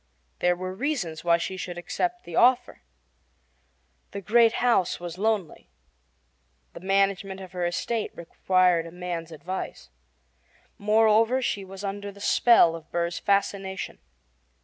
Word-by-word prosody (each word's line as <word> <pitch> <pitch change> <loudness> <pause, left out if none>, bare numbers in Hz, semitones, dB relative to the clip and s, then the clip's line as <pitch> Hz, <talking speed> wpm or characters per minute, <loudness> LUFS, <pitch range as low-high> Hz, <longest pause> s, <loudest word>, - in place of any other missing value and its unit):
There 180 0 +2
were 185 +1 -5
reasons 195 - -3
why 170 -1 +4
she 180 +3 -4
should 175 -1 -6
accept 355 - -3
the 170 - -8
offer. 250 - +3 1.3
The 200 - -5
great 230 +3 +4
house 235 -7 +1
was 175 0 -7
lonely. 210 -5 -1 1.0
The - - -9
management 195 0 0
of 190 -2 -10
her 180 -1 -1
estate 220 +6 -2
required 180 0 +1
a - - -10
man's 175 -2 -5
advice. 160 - -6 0.9
Moreover, 220 +3 +3
she 205 -6 -2
was 190 +1 -10
under 200 0 -4
the 200 - -16
spell 200 -5 +5
of 160 -1 -11
Burr's 170 0 -1
fascination. 195 -1 -1
190 Hz, 130 wpm, -26 LUFS, 175-210 Hz, 1.3 s, spell